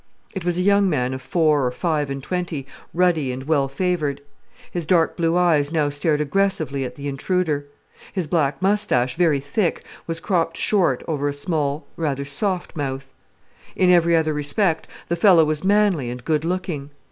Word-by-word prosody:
It 190 Hz, -4 st, -5 dB
was 175 Hz, 0 st, 0 dB
a 180 Hz, -, +1 dB
young 200 Hz, 0 st, +4 dB
man 130 Hz, -5 st, 0 dB
of 130 Hz, -, -6 dB
four 155 Hz, 0 st, +2 dB
or 125 Hz, -, +1 dB
five 150 Hz, +1 st, -1 dB
and 135 Hz, -1 st, -5 dB
twenty, 175 Hz, -6 st, -3 dB, 0.3 s
ruddy 165 Hz, -6 st, +1 dB
and 130 Hz, +1 st, -6 dB
well 140 Hz, -2 st, +1 dB
favoured. 150 Hz, -1 st, -1 dB, 0.5 s
His 170 Hz, -3 st, -3 dB
dark 165 Hz, -2 st, +3 dB
blue 165 Hz, 0 st, +1 dB
eyes 160 Hz, -5 st, +3 dB
now 155 Hz, -3 st, +1 dB
stared 150 Hz, +1 st, 0 dB
aggressively 150 Hz, -4 st, 0 dB
at 125 Hz, -1 st, -6 dB
the 145 Hz, +1 st, -6 dB
intruder. 145 Hz, 0 st, -1 dB, 0.4 s
His 185 Hz, -4 st, -1 dB
black 150 Hz, -3 st, 0 dB
moustache, 160 Hz, -11 st, +2 dB
very 160 Hz, -5 st, +2 dB
thick, 160 Hz, +7 st, -1 dB, 0.2 s
was 165 Hz, 0 st, +1 dB
cropped 165 Hz, -4 st, -1 dB
short 180 Hz, -, +2 dB
over 145 Hz, -3 st, -1 dB
a -, -, -3 dB
small, 145 Hz, -1 st, -2 dB
rather 140 Hz, -4 st, -2 dB
soft 180 Hz, +6 st, -1 dB
mouth. 135 Hz, -2 st, -4 dB, 0.6 s
In 185 Hz, -1 st, +4 dB
every 170 Hz, -1 st, +4 dB
other 160 Hz, -1 st, +1 dB
respect 160 Hz, +4 st, 0 dB, 0.2 s
the 170 Hz, -, 0 dB
fellow 170 Hz, -2 st, +5 dB
was 155 Hz, +1 st, -1 dB
manly 195 Hz, -9 st, +2 dB
and 125 Hz, 0 st, -7 dB
good 155 Hz, -1 st, +1 dB
looking. 170 Hz, -5 st, -3 dB
155 Hz, 175 wpm, -22 LUFS, 140-180 Hz, 0.6 s, fellow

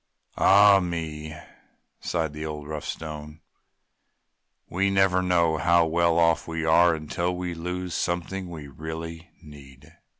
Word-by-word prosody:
"Ah 100 Hz, 0 st, +6 dB
me!" 80 Hz, -3 st, -5 dB, 0.6 s
sighed 80 Hz, -3 st, -2 dB
the 75 Hz, +1 st, -6 dB
old, 75 Hz, -2 st, -6 dB
rough 75 Hz, -1 st, -5 dB
Stone, 75 Hz, -1 st, -7 dB, 1.3 s
"We 100 Hz, +3 st, 0 dB
never 95 Hz, -1 st, +3 dB
know 85 Hz, -3 st, +2 dB
how 85 Hz, +1 st, +3 dB
well 85 Hz, +1 st, +2 dB
off 85 Hz, -1 st, +2 dB
we 80 Hz, -1 st, -3 dB
are 85 Hz, +1 st, +5 dB
until 85 Hz, +3 st, -3 dB
we 90 Hz, -1 st, -4 dB
lose 90 Hz, +1 st, -5 dB
something 90 Hz, +2 st, -3 dB
we 80 Hz, -4 st, -8 dB
really 80 Hz, +3 st, -8 dB
need!" 75 Hz, +1 st, -15 dB
85 Hz, 130 wpm, -25 LUFS, 80-90 Hz, 1.3 s, Ah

